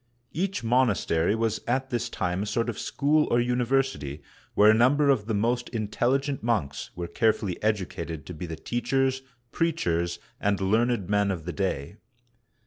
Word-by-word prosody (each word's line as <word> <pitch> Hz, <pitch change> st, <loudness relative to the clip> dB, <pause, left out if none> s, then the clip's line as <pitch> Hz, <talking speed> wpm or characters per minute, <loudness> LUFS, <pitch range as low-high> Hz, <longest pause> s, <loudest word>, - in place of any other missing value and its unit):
Each 180 Hz, -4 st, -2 dB
monastery 115 Hz, -7 st, +2 dB
was 115 Hz, -1 st, -1 dB
at 130 Hz, +2 st, 0 dB
this 120 Hz, -2 st, -1 dB
time 90 Hz, +1 st, -2 dB
a 105 Hz, -, -3 dB
sort 115 Hz, +3 st, 0 dB
of 115 Hz, -, -4 dB
school 150 Hz, +2 st, +2 dB
or 120 Hz, -, +3 dB
university, 120 Hz, -, 0 dB, 0.3 s
where 105 Hz, +1 st, +7 dB
a -, -, +5 dB
number 135 Hz, +6 st, +4 dB
of 115 Hz, -7 st, +2 dB
the 110 Hz, -, 0 dB
most 120 Hz, +4 st, 0 dB
intelligent 125 Hz, +5 st, 0 dB
monks 110 Hz, -12 st, -1 dB
were 85 Hz, -, -4 dB
carefully 105 Hz, -1 st, 0 dB
educated 90 Hz, -7 st, -2 dB
to 90 Hz, -, -7 dB
be 90 Hz, +2 st, -6 dB
the 80 Hz, -, -5 dB
teachers, 130 Hz, -, 0 dB, 0.3 s
preachers, 85 Hz, -, 0 dB, 0.2 s
and 100 Hz, -1 st, +1 dB
learned 110 Hz, +1 st, +1 dB
men 100 Hz, 0 st, +2 dB
of 85 Hz, -5 st, -3 dB
the 90 Hz, -, -4 dB
day. 95 Hz, -2 st, -2 dB
110 Hz, 160 wpm, -27 LUFS, 95-125 Hz, 0.3 s, where